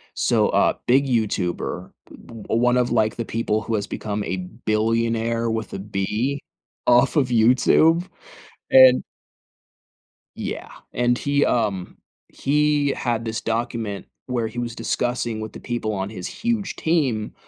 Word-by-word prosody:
So, - - +2
a - - +2
big 135 +3 +4
YouTuber, 105 -7 -1 0.2
b - - -12
b - - -12
one 125 +2 +2
of, 125 -1 +1
like, 110 -2 +2
the 115 - -4
people 110 -1 -1
who 115 - -4
has 100 -1 -2
become 105 -1 -4
a 95 - -3 0.3
billionaire 115 +1 +1
with 110 -1 -3
a 95 - -4
B, 105 +7 -2 0.5
off 125 +5 +4
of 135 -4 +2
YouTube, 130 +9 +4 0.6
and 130 -1 +8 1.3
Yeah, - - -5 0.2
and 120 0 +1
he 140 0 +1
um, 100 -6 -1 0.3
he 150 0 +1
had 115 -2 -1
this 110 -1 -2
document 115 -3 -3 0.2
where 120 -3 -1
he 110 +2 -10
was 120 -1 -3
discussing 120 -3 -2
with 110 - -7
the - - -9
people 120 -3 -3
on 95 0 -3
his 90 -5 -6
huge 225 -4 -2
team 135 -10 0
115 Hz, 145 wpm, -22 LUFS, 110-125 Hz, 1.3 s, and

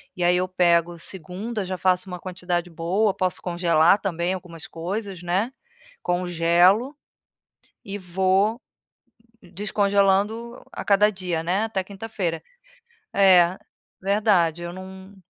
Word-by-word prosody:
e 180 - -2
aí 180 +1 +4
eu 185 - 0
pego 175 -2 +2
segunda, 190 +5 -5
já 185 0 -4
faço 185 0 +1
uma 180 -1 -6
quantidade 180 -1 -3
boa, 185 +6 0
posso 185 -1 -1
congelar 170 +1 +3
também 180 -2 -1
algumas 175 -3 -8
coisas, 190 +2 -5
né, 185 +7 0 0.5
congelo, 175 - +2 0.9
e 200 0 -5
vou 190 +4 +1 0.8
descongelando 200 +4 0
a - - -6
cada 205 +1 +5
dia, 180 -4 -3
né, 185 +5 0
até 210 -4 -2
quinta-feira. 195 -4 -4 0.7
É, 185 -2 +5 0.4
verdade 195 -5 +2
eu 170 - -5
não 190 +1 -11
185 Hz, 120 wpm, -24 LUFS, 175-200 Hz, 0.9 s, cada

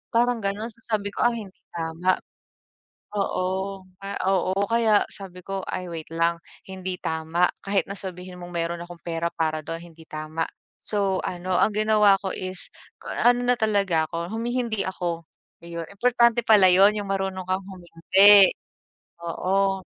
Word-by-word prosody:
parang 240 0 +3
gano'n. 205 +3 -2
So, 230 - -24
sabi 205 -1 -3
ko, - - 0
"Ay, 235 -2 -2
hindi 190 - -17 0.2
tama." 165 +2 0 1.0
Oo 190 0 -2 0.2
nga 195 0 -5 0.2
oo 185 -1 +1 0.2
kaya 225 -2 +4
sabi 185 -2 -10
ko, 195 +1 -5
"Ay, 180 -1 -4
wait 165 -2 -6
lang. 170 +1 +1 0.3
Hindi 185 -1 -5
tama." 160 +2 +1 0.2
Kahit 195 0 +1
na 200 - -5
sabihin 180 -1 -6
mong 175 0 -9
meron 170 0 -2
akong 175 -1 -12
pera 170 0 -2
para 155 -1 -1
do'n 165 +2 -5
hindi 160 0 -16
tama. 155 +1 -4 0.3
So, 200 -2 0
ano 180 0 -2
ang 215 - +3
ginawa 210 -2 +5
ko 195 - -3
is 185 0 -2 0.3
k - - -8 0.2
ano 245 0 +2
na 245 0 +3
talaga 200 -7 +2
ako 170 0 -4
humi-hindi 235 -2 -1
ako, 175 -3 -3 0.4
iyon 170 -1 -6
importante 235 +2 +3
pala 205 -5 +7
'yon 195 +3 +6
yung 200 - -7
marunong 195 -1 -2
kang 185 +1 -1
humindi. 190 +2 +6 0.8
Oo. 190 +3 0
190 Hz, 155 wpm, -25 LUFS, 170-205 Hz, 1.0 s, pala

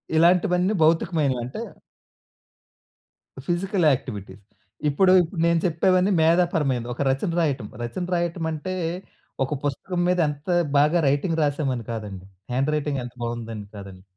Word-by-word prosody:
ఇలాంటివన్నీ 180 +3 +3
భౌతికమైనవి. 155 -4 +2
అంటే 125 - -6 1.9
physical 180 0 0
activities. 100 -6 -6 0.5
ఇప్పుడు 185 +6 +4 0.3
నేను 170 0 +3
చెప్పేవన్నీ 185 +3 +2
మేధాపరమైనది. 160 -7 +2
ఒక - - -5
రచన 135 +5 -1
రాయటం, 140 -9 0 0.2
రచన 150 +10 -4
రాయటం 170 -1 -2
అంటే 160 +4 -4 0.7
ఒక 135 - -2
పుస్తకం 175 +6 -2
మీద 180 0 +2
ఎంత 145 +4 -8 0.3
బాగా 150 +4 +4
రైటింగ్ 160 +4 0
రాసాము 145 -2 0
అని 115 - -7
కాదండి. 105 -5 -6 0.3
హ్యాండ్‌‌రైటింగ్ 145 +1 0
ఎంత 120 0 -8
బావుందని 115 -3 -5
కాదండి. 95 -2 -10
150 Hz, 120 wpm, -24 LUFS, 125-175 Hz, 1.9 s, ఇప్పుడు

